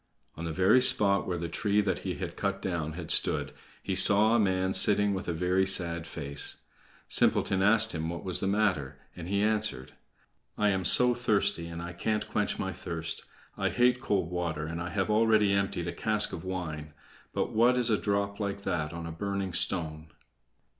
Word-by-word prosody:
On 85 - -6
the 80 - -3
very 95 +10 +4
spot 100 -6 +2
where 90 - -2
the 85 0 -4
tree 105 +5 0
that 95 -4 0
he 90 -2 -4
had 90 -3 -6
cut 100 -1 -2
down 85 -5 -3
had 85 0 -6
stood, - - +1 0.3
he - - -2
saw 100 +4 +6
a 120 - +3
man 95 -2 +1
sitting 105 0 +4
with 95 +1 -5
a - - 0
very 90 +3 +1
sad 85 -3 -1
face. 70 -2 -1 0.5
Simpleton 95 -1 +2
asked 110 +2 +5
him 80 -1 -3
what 85 0 -6
was 90 -2 0
the 95 - -2
matter, 95 -9 0 0.2
and 85 - -8
he 100 +2 0
answered: 105 -11 -1 0.6
"I 105 - +2
am 95 -2 -1
so 125 +7 +5
thirsty, 105 -8 0
and 85 0 -7
I 85 0 -7
can't 105 +5 -2
quench - - -1
my - - -3
thirst. 80 -1 -5 0.3
I - - +1
hate 125 +1 +2
cold 95 -8 -1
water, 85 -4 -3
and 80 +2 -5
I 85 - -4
have 95 +2 -1
already 110 -2 +3
emptied 100 -3 -1
a 85 - -4
cask 110 -1 0
of 80 - -6
wine; 80 -5 -6 0.4
but - - -2
what 120 +3 +4
is 120 -2 +1
a - - +4
drop 100 0 -2
like 100 -1 -3
that 85 -6 -3
on 85 0 -6
a 85 - -6
burning 100 +1 -4
stone?" 80 -2 -1
95 Hz, 195 wpm, -29 LUFS, 85-105 Hz, 0.6 s, saw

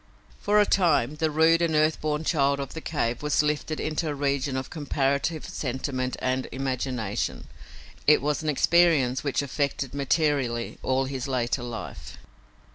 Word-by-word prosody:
For 210 +1 +3
a 210 - +5
time, 155 -8 +2
the 160 0 +1
rude 160 +2 +4
and 165 -2 +1
earth 155 +1 +2
born 150 0 -1
child 140 -3 +2
of 140 -1 -5
the 160 - -6
cave 120 -8 -2
was 150 0 +2
lifted 150 +1 -1
into 155 +1 -2
a 145 - -3
region 140 -1 -1
of 130 - -5
comparative 145 0 -1
sentiment 130 -1 -3
and 130 0 -1
imagination. 130 -5 -3 0.6
It 150 - +7
was 150 +1 -1
an 155 - -2
experience 150 -4 +3
which 145 0 0
affected 140 -1 -2
materially 140 -4 0
all 130 0 +1
his 130 -1 -4
later 125 -1 -1
life. 120 -2 -7
140 Hz, 155 wpm, -26 LUFS, 130-155 Hz, 0.6 s, It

